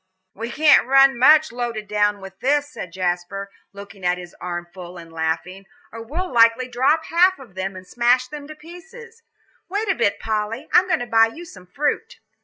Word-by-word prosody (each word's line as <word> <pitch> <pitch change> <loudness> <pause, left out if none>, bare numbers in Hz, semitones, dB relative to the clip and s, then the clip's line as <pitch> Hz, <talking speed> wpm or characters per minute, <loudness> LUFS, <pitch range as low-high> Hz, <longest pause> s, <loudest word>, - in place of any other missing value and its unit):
"We 230 +3 -6
can't 295 -1 +4
run 270 0 +5
much, 305 +4 +6
loaded 235 -3 -4
down 205 -1 0
with 190 0 -11
this," 290 +2 +1
said 180 - -8
Jasper, 185 +2 -3 0.2
looking 200 -1 -12
at 180 0 +1
his 175 -1 -11
armful 175 0 -7
and 165 -1 -12
laughing, 165 +4 -3 0.2
"or 230 - -8
we'd 300 +11 -4
likely 230 +2 +4
drop 270 +6 +1
half 365 +3 +3
of 255 -8 -15
them, 190 +1 -4
and 185 0 -10
smash 245 +5 +2
them 290 +1 -9
to 310 - -10
pieces. 390 +9 -14 0.5
Wait 410 +4 -2
a - - +4
bit, 205 - 0
Polly, 220 +5 -3
I'm 370 - +5
going 350 - 0
to - - -3
buy 225 -1 +4
you 325 +10 -10
some 185 - -14
fruit." 290 +11 -3
230 Hz, 190 wpm, -21 LUFS, 190-295 Hz, 0.5 s, much